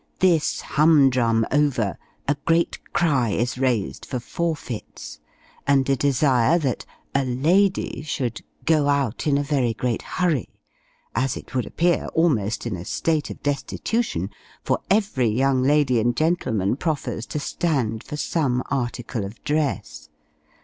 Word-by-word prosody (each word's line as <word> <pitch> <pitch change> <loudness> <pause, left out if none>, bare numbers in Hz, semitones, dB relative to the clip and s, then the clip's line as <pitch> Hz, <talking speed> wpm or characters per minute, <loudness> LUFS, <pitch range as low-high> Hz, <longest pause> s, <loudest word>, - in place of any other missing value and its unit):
This 170 -5 +2
hum 150 -3 +4
drum 115 -3 +2
over, 130 - +1 0.3
a 140 - +2
great 165 +1 +2
cry 140 -9 +2
is 120 +4 -1
raised 125 -7 0
for 125 - -4
Forfeits! 150 -4 -5 0.5
and 135 -2 +3
a 135 - +3
desire 135 +1 +3
that 135 -8 -2 0.3
a 140 - +2
lady 170 +10 +1
should 130 -6 -3 0.2
go 155 -3 +3
out 140 -2 0
in 140 -1 +3
a 145 - 0
very 135 -6 0
great 120 0 -1
hurry, 170 - -1 0.6
as 130 +3 0
it - - -11
would 125 -2 -1
appear, 175 0 +1
almost 120 - +1
in 115 -5 -2
a 85 - -6
state 155 - -1
of - - -9
destitution; 145 - -1 0.3
for - - +1
every 195 - +2
young 130 +3 +2
lady 135 -3 +3
and 120 +1 +1
gentleman 125 - +1
proffers 135 -8 -2
to 150 - -3
stand 135 -8 -1
for 150 - -6
some 135 -6 0
article 120 -3 -2
of 100 +4 -9
dress. 75 - -2
135 Hz, 140 wpm, -23 LUFS, 120-155 Hz, 0.6 s, hum